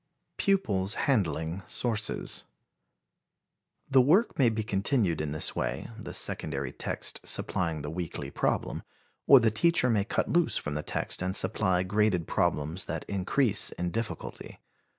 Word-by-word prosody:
Pupils 105 - +1
Handling 90 - 0
Sources. 115 -3 -1 1.4
The 135 -1 +5
work 175 - +3
may 125 -4 +5
be 110 -1 -2
continued 100 - +1
in 75 -2 -3
this 75 - 0
way, - - -3
the 110 - -8
secondary 70 -3 -2
text - - -2
supplying 80 -4 -1
the 75 - -4
weekly 85 -1 -5
problem, - - -1 0.5
or 140 - +9
the 115 -2 +3
teacher 125 +1 +3
may 105 -3 +2
cut 105 - -1
loose 170 -1 +2
from 75 - -3
the 75 - -2
text - - -2
and 95 +1 -1
supply 95 -5 +2
graded 95 -3 +1
problems 80 +6 0
that - - -4
increase 100 +3 +1
in 90 0 -3
difficulty. 115 +2 -5
100 Hz, 140 wpm, -29 LUFS, 85-115 Hz, 1.4 s, or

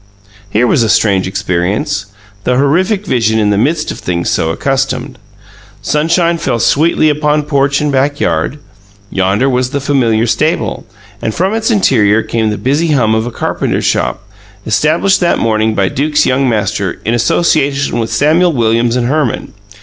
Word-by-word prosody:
Here 110 +5 +1
was 120 - +2
a 115 - +1
strange 95 -5 +2
experience 95 +1 -2 0.4
the 125 - +1
horrific 185 +9 +1
vision 115 - +1
in 105 -1 +1
the - - +2
midst 150 +6 0
of - - -8
things 85 -1 -2
so 80 - 0
accustomed. 135 - -2 0.6
Sunshine 170 +2 +1
fell 120 - -1
sweetly 155 +6 +2
upon 150 0 +1
porch 140 -1 0
and 150 -1 0
backyard; 140 +2 0 0.5
yonder 95 +7 +1
was 125 -1 0
the 140 +1 -2
familiar 120 -5 +1
stable, 120 - -1 0.3
and 110 - -3
from 190 +4 0
its 225 +1 -1
interior 115 - +2
came 110 -2 -1
the 105 - -2
busy 150 +5 0
hum 110 -6 +2
of 110 +1 0
a - - -5
carpenter - - -2
shop, 95 - -1 0.4
established 155 - +2
that 175 -2 +1
morning 110 -1 0
by 95 -1 +1
Duke's 150 +7 0
young 130 0 +1
master, 105 -4 -2
in 115 - 0
association 140 +1 +1
with 115 -1 -3
Samuel 160 +8 +2
Williams 115 -1 +1
and 125 -1 0
Herman. 140 -2 -1
125 Hz, 160 wpm, -13 LUFS, 110-150 Hz, 0.6 s, was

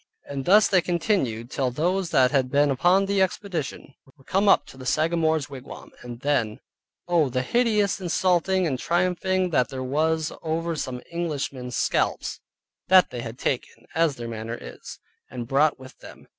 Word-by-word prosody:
And 140 -2 -5
thus 210 +3 +6
they 185 -2 +3
continued 160 - -1
till 130 -3 0
those 175 +7 -1
that 130 -5 +4
had 130 -2 +1
been 145 +1 +3
upon 180 +9 +3
the 200 0 +1
expedition 180 -7 -3 0.2
were 135 - -21
come 195 +7 +2
up - - +5
to - - -14
the 130 -1 -8
Sagamore's 160 0 +1
wigwam; 135 -2 -10
and 120 0 -9
then, 125 -7 0 0.5
Oh, 170 -5 +2
the 130 +1 -1
hideous 210 - +1
insulting 185 +1 +1
and 135 -6 -1
triumphing 180 +2 0
that 125 -5 +2
there 130 -1 -5
was 155 +4 0
over 165 +1 -2
some 130 -4 -5
Englishmen's 140 -7 -3
scalps - - 0 0.5
that 185 0 +6
they 120 - -5
had 115 +1 -7
taken 130 -2 -3
(as 165 -3 +2
their 120 -2 -6
manner 115 0 -5
is) - - -10 0.3
and 120 -2 -6
brought 145 +4 +3
with 130 -1 -14
them. - - -14
155 Hz, 170 wpm, -25 LUFS, 130-180 Hz, 0.5 s, thus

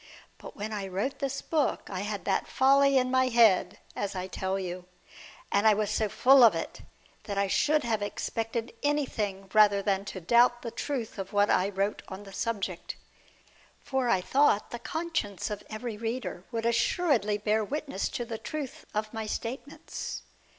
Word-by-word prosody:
But - - -10
when 215 +1 -5
I 200 -2 -3
wrote 200 +9 -3
this 275 0 -3
book 305 -4 0
I 185 - -4
had 205 0 -4
that - - 0
folly 275 +1 +4
in 255 0 +2
my 260 0 +3
head, 215 -6 +4 0.2
as 200 -1 -3
I 185 0 -3
tell 190 0 -2
you. 180 -1 -5 0.7
And 200 +2 +3
I 215 - +6
was 210 0 -1
so 215 0 0
full 265 +5 +6
of 220 -7 +7
it, 165 - -5 0.4
that 200 -1 -4
I 200 - +3
should 300 +9 +2
have 225 -3 0
expected 225 +2 -3
anything 220 -10 -1
rather 205 -2 +5
than 195 -1 +1
to 195 - -6
doubt 240 +6 +4
the 230 - -4
truth 245 -7 -4
of 195 +1 -6
what 205 0 +3
I 185 +2 +3
wrote 200 +1 -1
on 190 +1 -8
the 195 -1 -12
subject. 200 -6 -3 0.9
For 265 -3 0
I 190 - +3
thought 265 -1 +2
the 240 - -5
conscience 255 - -3
of 205 - -4
every 215 0 -5
reader 225 -5 -4
would 230 -1 -2
assuredly 235 - +2
bear 215 +1 +1
witness 275 -2 -3
to 240 - -4
the 225 -1 -5
truth 295 -4 -6
of 215 +1 -2
my 220 -1 -4
statements. 255 +6 -5
220 Hz, 180 wpm, -29 LUFS, 200-255 Hz, 0.9 s, of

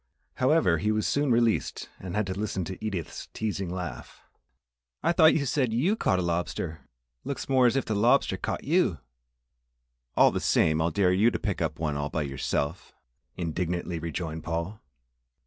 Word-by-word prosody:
However, 130 - +3
he 105 +4 +1
was 110 0 0
soon 145 0 +1
released 115 -2 +1
and 90 -1 -6
had 105 0 +1
to 95 - -3
listen 95 -2 -3
to 95 +5 -7
Edith's 95 -7 -4
teasing 100 -4 -2
laugh. 90 -2 -6 0.8
"I 170 - +3
thought 160 -2 +6
you 145 - +1
said 130 -3 0
you'd 175 - +1
caught 95 - +2
a 90 - 0
lobster! 85 -1 -3 0.3
Looks 140 - -4
more 130 -2 +4
as 120 - +1
if 135 - 0
the 110 - -1
lobster 115 0 +3
caught - - -4
you!" 155 - +2 1.2
"All - - +6
the - - -1
same, 80 0 +2
I'll 80 - +2
dare 90 +1 +2
you 105 +5 +4
to - - -2
pick 100 -5 -3
up 80 -1 -1
one 75 -3 -2
all 70 0 -2
by 80 - -1
yourself!" 70 +4 -3 0.4
indignantly 85 0 -2
rejoined 80 -1 -4
Paul. 85 +6 -3
95 Hz, 175 wpm, -27 LUFS, 85-120 Hz, 1.2 s, thought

